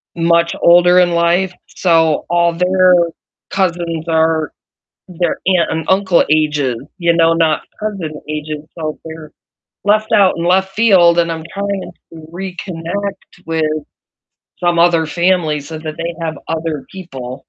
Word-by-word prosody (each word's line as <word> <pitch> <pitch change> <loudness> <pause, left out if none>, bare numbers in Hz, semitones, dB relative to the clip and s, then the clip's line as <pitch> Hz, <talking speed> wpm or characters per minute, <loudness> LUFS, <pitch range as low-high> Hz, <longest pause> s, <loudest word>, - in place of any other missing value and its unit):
much 170 0 +2
older 175 +1 +6
in 180 -1 +3
life, 170 +2 +1
so 165 -4 +1
all 170 0 +2
their 185 +1 +3 0.6
cousins 170 -3 -2
are 160 -1 +1 0.6
their 175 -1 -2
aunt 180 -3 +2
and 160 0 -3
uncle 190 -2 +3
ages, 150 -5 +1 0.2
you 170 -1 +2
know, 165 0 +3
not 165 -2 +1 0.2
cousin 185 -8 -5
ages, 150 0 -5
so 155 -2 -4
they're 160 -1 -9 0.5
left 215 +1 +2
out 195 -2 +4
in 170 - -2
left 190 +2 +2
field, 185 -6 +4
and 170 -1 +2
I'm 160 -1 -6
trying 200 -2 -4 0.2
to 160 -1 -11
reconnect 185 +1 -6
with 160 -1 -1 1.0
some 175 -1 +1
other 170 -1 +3
family 170 -3 +1
so 155 +3 -8
that 155 -1 -7
they 170 +1 -3
have 160 -3 -3
other 160 -3 -3
people. 135 -9 -8
170 Hz, 140 wpm, -16 LUFS, 160-180 Hz, 1.0 s, older